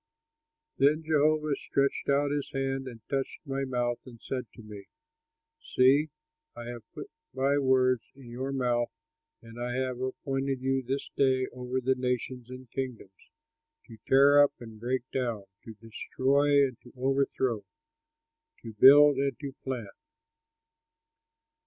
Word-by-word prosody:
Then 150 +3 +3
Jehovah 155 -1 +2
stretched 140 0 -1
out 140 +1 +2
his 145 -1 -2
hand 135 0 -2
and 115 -3 -11
touched 135 +3 -3
my 135 -1 -2
mouth 120 -2 -1
and 120 -2 -12
said 125 0 -5
to 115 - -12
me: 105 -2 -11 0.7
"See. 140 - +3 0.5
I 120 - -7
have 120 -1 -7
put - - -8 0.2
my 140 +2 +2
words 130 -2 +3
in 130 -3 -13
your 130 +3 -4
mouth, 120 -3 0 0.5
and 115 +1 -10
I 120 0 -2
have 130 -1 -2
appointed 135 +1 -2
you 135 +1 0
this 135 +2 -4
day 130 -2 +2
over 125 +1 -3
the 130 +1 +1
nations 125 -1 -3
and 130 0 -10
kingdoms, 120 -8 -7 0.6
to 115 -3 -13
tear 140 +2 +6
up 145 - +1
and 115 -2 -11
break 125 +2 -1
down, 120 -6 -2 0.2
to 110 - -9
destroy 140 +6 +1
and 130 -3 -7
to 120 - -16
overthrow, 130 -3 0 1.0
to 115 -2 -8
build 140 +5 +8
and 135 -3 -1
to 140 -2 -6
plant." 120 -7 -5
130 Hz, 140 wpm, -29 LUFS, 120-140 Hz, 1.0 s, build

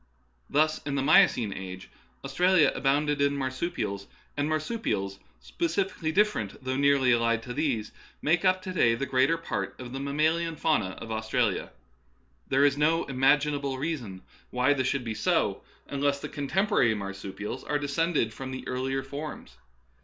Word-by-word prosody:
Thus 155 +1 +2
in 145 -1 -3
the 135 - 0
Miocene 120 -7 +4
age 95 0 -8 0.3
Australia 180 -2 +4
abounded 145 +1 +1
in 140 0 +2
marsupials, 130 - -3 0.3
and 145 +1 -1
marsupials 155 - -2 0.2
specifically 195 - -2
different, 160 - 0
though 130 0 -2
nearly 140 -2 +3
allied 115 -1 +2
to 125 - -6
these, 125 -7 -1 0.3
make 165 +4 +1
up 185 0 +2
to 185 -1 -5
day 115 -10 +3
the 140 - -2
greater 135 +5 +2
part 100 - -4
of 125 -1 -8
the 135 - -4
mammalian 155 +4 0
fauna 120 -12 0
of 115 - -8
Austra 110 0 +1
lia. - - -5 0.8
There 135 +2 +3
is 145 0 +2
no 160 +3 +3
imaginable 140 +1 +1
reason 125 - -4 0.3
why 125 +3 +2
this 130 -2 0
should 135 -1 -1
be 115 -2 -3
so, 105 - 0 0.3
unless 140 0 0
the - - -6
contemporary 145 - +1
marsupials 100 +4 -6
are 150 - 0
descended 145 -4 0
from 135 -1 -7
the 130 0 -6
earlier 130 +1 -2
forms. 140 - -7
140 Hz, 155 wpm, -28 LUFS, 115-155 Hz, 0.8 s, Miocene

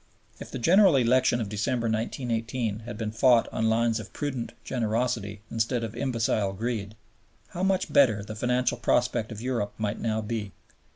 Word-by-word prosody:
If - - -8
the - - -5
General 180 - +5
Election 125 -1 +3
of 110 - -2
December, 105 +4 -1
1918, 115 0 -2
had 120 - -6
been 110 -2 -3
fought 115 +1 +4
on 110 0 +1
lines 115 0 +2
of 110 - -9
prudent 135 -5 -3
generosity 110 -3 -1
instead 115 +1 0
of 115 0 -5
imbecile 115 -6 0
greed, 110 -1 -3 0.5
how 175 - -6
much 190 -1 +1
better 110 -8 +4
the 110 - -7
financial 125 +3 0
prospect 120 -2 +1
of 110 -1 -7
Europe 115 -5 -2
might 105 -1 -2
now 110 -1 -1
be. 105 -2 -4
115 Hz, 165 wpm, -27 LUFS, 110-125 Hz, 0.5 s, General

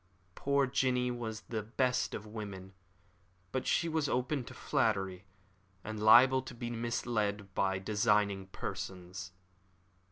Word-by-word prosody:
Poor 140 +4 +2
Jinny 125 -1 +1
was 110 -3 -4
the 110 -1 -4
best 125 +4 0
of 105 - -6
women, 100 -3 -7 0.8
but 130 - -2
she 170 - +2
was 160 -3 0
open 125 +2 0
to - - -9
flattery, 95 -8 0 0.6
and 110 0 -5
liable 130 +5 +7
to 130 - -9
be 120 0 -4
misled 110 -4 -2
by 95 0 +1
designing 105 -1 +1
persons. 95 -1 -6
110 Hz, 125 wpm, -33 LUFS, 100-125 Hz, 0.8 s, liable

